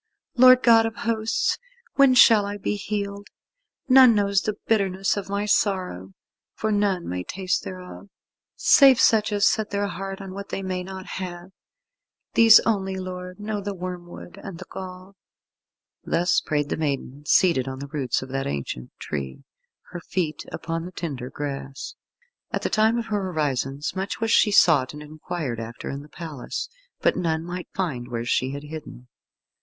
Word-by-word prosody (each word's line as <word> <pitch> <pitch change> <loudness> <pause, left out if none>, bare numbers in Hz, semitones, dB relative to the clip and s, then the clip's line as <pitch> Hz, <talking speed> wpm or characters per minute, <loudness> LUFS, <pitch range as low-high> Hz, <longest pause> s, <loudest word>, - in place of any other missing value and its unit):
Lord 255 0 +7
God 225 -1 +6
of 225 - -6
Hosts, 225 0 0 0.3
when 275 -2 +5
shall 225 -4 +7
I 205 0 -4
be 205 - -2
healed? 200 0 -4 0.6
None 255 -3 +7
knows 200 -1 +2
the 215 - -2
bitterness 195 -3 +1
of 200 -1 -5
my 200 +1 -1
sorrow, 185 - 0 0.4
for 220 - -1
none 200 -4 0
may 90 0 -3
taste 185 - -2
thereof, 185 +2 -9 0.5
save 270 -3 +6
such 220 -3 +4
as 205 0 +2
set 215 -2 +2
their 200 0 -1
heart 195 -1 -5
on 195 -1 -8
what 200 +1 -7
they 195 - -4
may 185 -1 -2
not 190 0 -8
have. 180 -1 -7 0.8
These 225 -1 +8
only, 195 -4 -1
Lord, 180 0 -7
know 210 0 -3
the 200 0 -4
wormwood 180 +1 -8
and 195 -4 -7
the - - -9
gall." 185 +1 -9 0.9
Thus 175 +2 +1
prayed 145 -1 -1
the - - -2
maiden, 145 -2 -3
seated 145 -9 +3
on 130 0 -5
the 140 - -6
roots 135 -5 -1
of 130 - -10
that 135 +1 -2
ancient 70 -3 -4
tree, 70 - -5 0.5
her 175 - -6
feet 160 -3 -3
upon 165 0 -4
the 180 - -7
tender 140 -8 -5
grass. 135 -1 -6 0.6
At - - -3
the - - -1
time 220 +2 +3
of 235 - -2
her 205 -4 -2
orisons 145 -1 -2
much 190 +1 -3
was 225 0 0
she 215 - +5
sought 150 -10 +4
and 150 - -8
inquired 150 -4 -5
after 115 +1 -6
in 140 - -5
the 150 - -14
palace, 155 -5 -6 0.3
but - - +3
none 160 -2 -1
might 180 0 -6
find 140 -11 -2
where 120 -1 -4
she 130 +1 +1
had 140 +1 -6
hidden. 150 -5 -9
185 Hz, 170 wpm, -24 LUFS, 150-205 Hz, 0.9 s, These